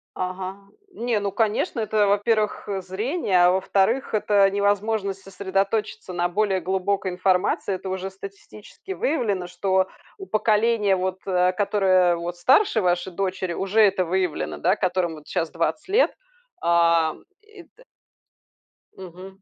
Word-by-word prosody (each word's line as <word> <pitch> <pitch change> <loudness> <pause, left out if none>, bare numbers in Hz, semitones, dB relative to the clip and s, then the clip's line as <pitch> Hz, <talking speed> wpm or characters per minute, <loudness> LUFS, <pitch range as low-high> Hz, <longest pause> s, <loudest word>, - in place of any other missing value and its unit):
Ага. 185 +1 -4 0.3
Не, 235 -7 -1
ну, 200 -1 -2
конечно. 220 +2 0
Это, 215 -1 +1
во-первых, 210 +1 0
э, 195 -2 -3
зрение, 190 - +1
а 180 - +5
во-вторых, 195 +7 +1
это 205 -2 +3
невозможность 200 0 0
сосредоточиться 195 +2 -2
на 175 0 0
более 195 +1 0
глубокой 190 +1 -1
информации. 185 +1 0
Это 190 - -8
уже 190 0 -3
статистически 195 - -11
выявлено, 220 - -1
что 190 +1 0 0.3
у 385 - -8
поколения, 215 - +2
вот, 185 0 -2
э, 180 -1 +2
которое 185 -3 +2
вот 170 +1 -5
старше 240 - +3
вашей 180 0 0
дочери, 185 -1 -2
уже 195 +5 +1
это 195 -3 +4
выявлено, 180 -2 -2
да, 185 +3 +2
которым 185 -4 -1
вот 150 -1 -14
сейчас 165 -1 -2
20 175 - -2
лет. 435 +6 +3 0.5
А 170 -2 +3 0.6
это - - -19 1.1
Мгм. 190 +1 -11
195 Hz, 135 wpm, -23 LUFS, 185-210 Hz, 1.1 s, а